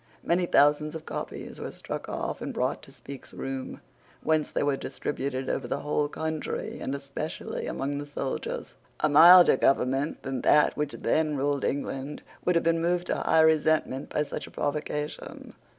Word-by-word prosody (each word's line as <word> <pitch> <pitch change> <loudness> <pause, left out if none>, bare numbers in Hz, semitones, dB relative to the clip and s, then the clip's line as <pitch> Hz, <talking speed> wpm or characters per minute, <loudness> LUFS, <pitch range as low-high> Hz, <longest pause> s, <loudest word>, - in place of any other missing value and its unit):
Many 175 +1 +1
thousands 150 +1 +3
of 160 - -7
copies - - -6
were - - -5
struck - - -6
off - - -4
and - - -3
brought - - -1
to - - -14
Speke's 140 -1 -11
room, 135 -1 -5 0.4
whence 155 -1 +1
they - - -1
were 145 -1 +2
distributed 135 -1 -4
over 130 - -2
the 140 - -2
whole 150 0 0
country, 160 0 -4
and 135 - -3
especially 140 +3 -5
among 140 +1 -2
the 145 - -6
soldiers. 140 -2 -4 0.3
A 155 - +3
milder 170 +1 +8
government 135 +3 +1
than 135 -2 -3
that 150 0 +4
which 150 -1 -2
then 155 -2 0
ruled 140 0 0
England 140 +1 -3 0.2
would 180 - +2
have 170 - +3
been 165 0 +2
moved 175 +1 +1
to - - 0
high 160 - +3
resentment 155 -3 +2
by 150 - 0
such 150 - -6
a - - -13
provocation. 150 0 -4
145 Hz, 170 wpm, -27 LUFS, 140-160 Hz, 0.4 s, milder